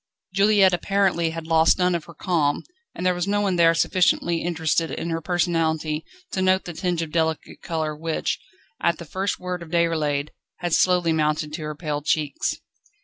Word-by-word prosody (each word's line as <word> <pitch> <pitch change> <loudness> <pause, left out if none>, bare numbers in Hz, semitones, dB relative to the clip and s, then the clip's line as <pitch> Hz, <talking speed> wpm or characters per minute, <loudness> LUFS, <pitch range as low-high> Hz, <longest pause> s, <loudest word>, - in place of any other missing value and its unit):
Juliette 195 -1 +5
apparently 180 -2 +1
had 165 0 -6
lost 160 0 +4
none 180 -1 +2
of 170 -3 -2
her 170 - -13
calm, 150 -4 0 0.3
and 180 - -4
there 180 - +4
was 175 +1 -2
no 205 +1 +1
one 195 -3 +1
there 165 -1 +5
sufficiently 175 -1 +2
interested 165 -1 0
in 170 - -4
her 165 0 -2
personality 160 -2 0 0.3
to 190 - -1
note 185 0 +2
the 175 - -6
tinge 175 0 -1
of 155 - -7
delicate 160 -1 -1
colour 155 -2 -2
which, 160 +1 -2 0.4
at 170 - +2
the 170 - -9
first 190 +5 -2
word 180 -1 -4
of 170 - -9
Déroulède, 155 -4 +1 0.3
had 175 -2 -2
slowly 180 -2 +3
mounted 155 0 0
to 160 - -4
her 150 0 -4
pale 150 -2 -3
cheeks. 150 -1 0
165 Hz, 185 wpm, -23 LUFS, 160-180 Hz, 0.4 s, Juliette